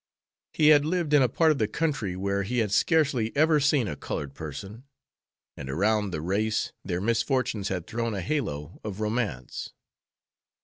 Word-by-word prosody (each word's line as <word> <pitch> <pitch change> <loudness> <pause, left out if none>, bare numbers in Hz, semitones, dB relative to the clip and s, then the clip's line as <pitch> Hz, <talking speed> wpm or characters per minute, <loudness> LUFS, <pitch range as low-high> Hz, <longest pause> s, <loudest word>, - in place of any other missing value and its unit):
He 155 -1 +4
had 145 -2 +7
lived 165 -1 -1
in 145 - +7
a 130 - +3
part 160 +6 +3
of 150 - -1
the 110 - +2
country 115 - -1
where 100 +1 -1
he 115 +6 -3
had 110 -4 +1
scarcely 135 - +2
ever 155 0 +4
seen 145 -4 +2
a - - -3
colored 70 -2 -5
person, 95 - -8 0.7
and 70 - -7
around 105 +7 +1
the 80 -4 -4
race 105 +6 -1
their 90 - -2
misfortunes 115 -1 0
had 90 -4 -3
thrown 115 0 -2
a 95 - -3
halo 85 - -3
of 105 -2 -5
romance. 105 - -3
110 Hz, 170 wpm, -27 LUFS, 95-140 Hz, 0.7 s, had